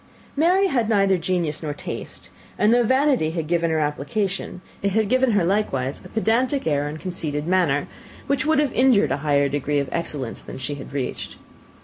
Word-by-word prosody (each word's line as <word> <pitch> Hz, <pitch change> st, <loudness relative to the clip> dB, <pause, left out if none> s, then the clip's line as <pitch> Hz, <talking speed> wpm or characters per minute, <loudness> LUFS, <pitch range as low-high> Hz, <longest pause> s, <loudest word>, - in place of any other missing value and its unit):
Mary 355 Hz, +6 st, +3 dB
had 240 Hz, -, +1 dB
neither 195 Hz, -3 st, +3 dB
genius 175 Hz, -3 st, -1 dB
nor 150 Hz, -2 st, -4 dB
taste; -, -, -7 dB, 0.3 s
and 210 Hz, +2 st, +4 dB
though 245 Hz, -, +4 dB
vanity 260 Hz, -, +2 dB
had 165 Hz, -1 st, -3 dB
given 170 Hz, +1 st, +1 dB
her 160 Hz, -, +1 dB
application, 175 Hz, +6 st, -2 dB, 0.2 s
it 200 Hz, -1 st, 0 dB
had 220 Hz, 0 st, +2 dB
given 255 Hz, +1 st, +2 dB
her 200 Hz, -4 st, +3 dB
likewise 145 Hz, -9 st, -1 dB
a -, -, -12 dB
pedantic 240 Hz, +5 st, +1 dB
air 145 Hz, -2 st, +1 dB
and 150 Hz, +2 st, -6 dB
conceited 155 Hz, -5 st, -4 dB
manner, 170 Hz, -6 st, +1 dB, 0.4 s
which 280 Hz, 0 st, 0 dB
would 315 Hz, +1 st, +2 dB
have 290 Hz, -3 st, +1 dB
injured 240 Hz, -, +4 dB
a 135 Hz, -, +1 dB
higher 145 Hz, -1 st, +2 dB
degree 145 Hz, +1 st, -1 dB
of 140 Hz, -1 st, -1 dB
excellence 145 Hz, -7 st, -4 dB
than -, -, -9 dB
she 130 Hz, +3 st, -4 dB
had 145 Hz, -, -9 dB
reached. 135 Hz, -2 st, -4 dB
175 Hz, 190 wpm, -23 LUFS, 145-225 Hz, 0.4 s, and